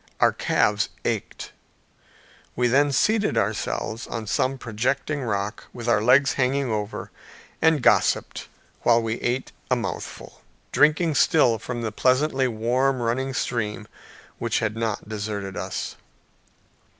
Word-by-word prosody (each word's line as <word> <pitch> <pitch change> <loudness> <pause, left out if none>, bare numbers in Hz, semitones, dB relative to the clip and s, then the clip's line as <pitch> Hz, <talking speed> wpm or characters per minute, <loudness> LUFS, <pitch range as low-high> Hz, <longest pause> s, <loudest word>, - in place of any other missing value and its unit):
Our - - +5
calves - - +1 0.2
ached. - - -3 1.0
We 125 - +2
then 140 +4 +3
seated 210 - +2
ourselves 110 +1 -2
on 115 -1 -5
some 130 +5 0
projecting 130 +6 -2
rock 105 -3 -3
with 120 -1 -7
our 115 -3 +3
legs 135 +5 +5
hanging 135 -1 0
over, 105 -1 -4 0.5
and 160 -5 +3
gossiped - - +2 0.3
while 120 -1 +4
we 115 0 -2
ate 125 +2 -1 0.2
a - - +3
mouthful - - -6 0.3
drinking 155 +2 +3
still 135 -7 +4
from 120 +1 -5
the 110 - -2
pleasantly 130 +3 +2
warm 125 +4 +1
running 130 +3 -1
stream 105 -3 -2 0.5
which - - 0
had 110 -1 -1
not 115 -3 -3
deserted 105 -2 -4
us. - - -4
120 Hz, 125 wpm, -24 LUFS, 110-135 Hz, 1.0 s, Our